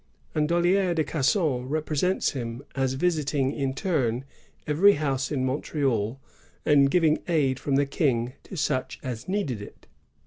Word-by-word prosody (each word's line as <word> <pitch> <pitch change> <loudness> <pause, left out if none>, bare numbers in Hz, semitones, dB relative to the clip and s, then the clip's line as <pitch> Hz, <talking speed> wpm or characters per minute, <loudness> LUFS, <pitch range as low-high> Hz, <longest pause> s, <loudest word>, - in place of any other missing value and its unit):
And 150 0 +1
Dollier 175 +1 +2
de 160 - +2
Casson 140 -4 0
represents 155 +4 0
him 120 -1 -5
as 135 -1 0
visiting 145 -3 0
in 135 -2 -2
turn 135 -8 0 0.4
evenr 180 +7 +5
house 135 -2 -1
at 145 - -1
Mont^al, 130 -3 -1 0.5
and 140 -2 +5
giving 160 -2 +3
aid 140 -6 +1
from 140 - -1
the 140 +1 +3
King 130 -4 0
to 190 - -8
such 140 -4 -1
a. 130 -3 -3
needed 185 - -2
it. 105 - -12
140 Hz, 145 wpm, -26 LUFS, 130-160 Hz, 0.5 s, evenr